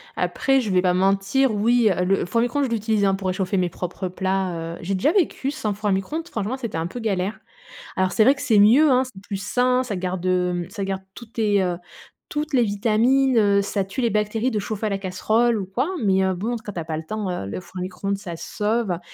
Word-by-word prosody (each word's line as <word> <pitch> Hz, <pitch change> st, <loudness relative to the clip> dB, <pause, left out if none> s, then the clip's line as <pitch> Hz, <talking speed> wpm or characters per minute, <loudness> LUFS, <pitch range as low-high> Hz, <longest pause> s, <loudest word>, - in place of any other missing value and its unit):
Après, 270 Hz, -1 st, +1 dB
je 220 Hz, -, -3 dB
vais 185 Hz, -1 st, +4 dB
pas 180 Hz, -1 st, +2 dB
mentir, 195 Hz, +7 st, +2 dB
oui, 230 Hz, +2 st, +3 dB
heu, 180 Hz, 0 st, 0 dB
le 195 Hz, +1 st, +1 dB
four 205 Hz, +7 st, 0 dB
à -, -, +4 dB
micro-ondes, 275 Hz, +4 st, 0 dB
je -, -, -3 dB
l'utilise, 220 Hz, -2 st, 0 dB
hein, 195 Hz, -, +3 dB
pour 195 Hz, -1 st, -4 dB
réchauffer 190 Hz, +1 st, -1 dB
mes 180 Hz, -1 st, +1 dB
propres 180 Hz, +2 st, -5 dB
plats, 190 Hz, 0 st, -1 dB, 0.2 s
heu, -, -, -11 dB
j'ai 190 Hz, +3 st, -2 dB
déjà 275 Hz, -, +2 dB
vécu 320 Hz, -7 st, 0 dB
sans 215 Hz, -7 st, -2 dB
four 210 Hz, +1 st, -2 dB
à -, -, +2 dB
micro-ondes. 300 Hz, -, -2 dB
Franchement, 225 Hz, -, -3 dB
c'était 235 Hz, -9 st, -4 dB
un 165 Hz, +1 st, -1 dB
peu 245 Hz, -, -7 dB
galère. 200 Hz, -2 st, -2 dB, 0.6 s
Alors, 185 Hz, 0 st, +1 dB
c'est 220 Hz, -, +4 dB
vrai 270 Hz, +5 st, +5 dB
que -, -, -9 dB
c'est 230 Hz, -8 st, +3 dB
mieux, 245 Hz, +10 st, +6 dB
hein, 255 Hz, +1 st, +4 dB
c'est 195 Hz, -7 st, -12 dB
plus 195 Hz, -1 st, -5 dB
sain. 250 Hz, +2 st, +2 dB
Ça 230 Hz, -5 st, -4 dB
garde, 185 Hz, 0 st, -3 dB
hem, 180 Hz, -1 st, 0 dB
ça 200 Hz, +1 st, -5 dB
garde 190 Hz, 0 st, -3 dB
toutes 235 Hz, -1 st, -12 dB
tes, 205 Hz, -3 st, +2 dB
heu, 175 Hz, -1 st, -1 dB, 0.5 s
toutes 300 Hz, 0 st, -3 dB
les 245 Hz, -, +4 dB
vitamines, 230 Hz, +5 st, +2 dB
heu, 200 Hz, -2 st, +4 dB
ça 200 Hz, 0 st, -1 dB
tue 195 Hz, +7 st, -4 dB
les 235 Hz, -, +2 dB
bactéries 215 Hz, +4 st, 0 dB
de 215 Hz, -, 0 dB
chauffer 215 Hz, +1 st, -3 dB
à -, -, 0 dB
la 200 Hz, -, -1 dB
casserole 220 Hz, +5 st, +1 dB
ou 195 Hz, -, -3 dB
quoi, 240 Hz, -, -1 dB, 0.2 s
mais 190 Hz, -1 st, +3 dB
heu, 190 Hz, -, +1 dB
bon, 225 Hz, +7 st, -2 dB
quand 205 Hz, -, -7 dB
tu 170 Hz, -, -4 dB
as 160 Hz, -, -5 dB
pas 155 Hz, -1 st, -3 dB
le 160 Hz, -, -5 dB
temps, 210 Hz, +1 st, -4 dB
heu, 95 Hz, -, -4 dB
le -, -, -4 dB
four 185 Hz, -, -13 dB
à -, -, -3 dB
micro-ondes, 195 Hz, +2 st, -3 dB
ça 180 Hz, -5 st, -7 dB
sauve, 210 Hz, -4 st, -1 dB
205 Hz, 255 wpm, -23 LUFS, 185-235 Hz, 0.6 s, mieux